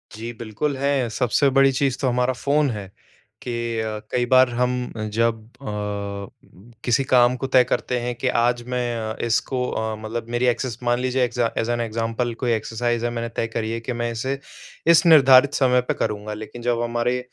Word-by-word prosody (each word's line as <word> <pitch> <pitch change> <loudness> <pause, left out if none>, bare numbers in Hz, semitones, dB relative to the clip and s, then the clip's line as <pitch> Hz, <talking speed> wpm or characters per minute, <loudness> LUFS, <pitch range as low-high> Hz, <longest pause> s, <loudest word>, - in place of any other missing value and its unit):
जी, 115 +2 -6
बिल्कुल 115 +6 -2
है, 135 -3 0
सबसे 125 +4 +2
बड़ी 135 0 +4
चीज़ 135 -1 0
तो 135 - +1
हमारा 125 +1 +1
फ़ोन 145 +3 +1
है 105 -5 -5 0.5
कि 120 -2 -3
अ, 110 -1 -3
कई 125 -1 +1
बार 130 +1 +5
हम 125 +1 -1 0.2
जब 115 0 +1 0.2
अ, 100 0 -7
किसी 130 +3 +2
काम 125 -1 +4
को 135 - -4
तय 130 -1 +5
करते 125 0 -1
हैं 120 +1 -3
कि 130 - -3
आज 120 0 +1
मैं 125 -1 -2 0.2
अ, - - -5
इसको 125 +2 0
अ, 110 0 -2
मतलब 110 +2 -5
मेरी 120 +1 0
एक्सेस 120 -1 -1
मान 120 0 +1
ली 130 - -1
एग्ज़ा 120 -2 +1
एज़ 115 +1 0
एन 120 0 0
एग्जाम्पल 115 +1 -2
कोई 120 - +2
एक्सरसाइज 115 +2 -1
है 120 - +1
मैंने 115 0 -4
तय 115 - 0
करी 110 0 -3
है 115 - -2
कि 120 +2 -4
मैं 120 - -1
इसे 130 +4 -3 0.5
इस 170 +2 +5
निर्धारित 140 -4 +7
समय 125 -2 +3
पे - - +1
करूँगा। 105 0 -3
लेकिन 110 +3 -8
जब 120 0 0
हमारे 120 +1 0
120 Hz, 195 wpm, -22 LUFS, 115-130 Hz, 0.5 s, निर्धारित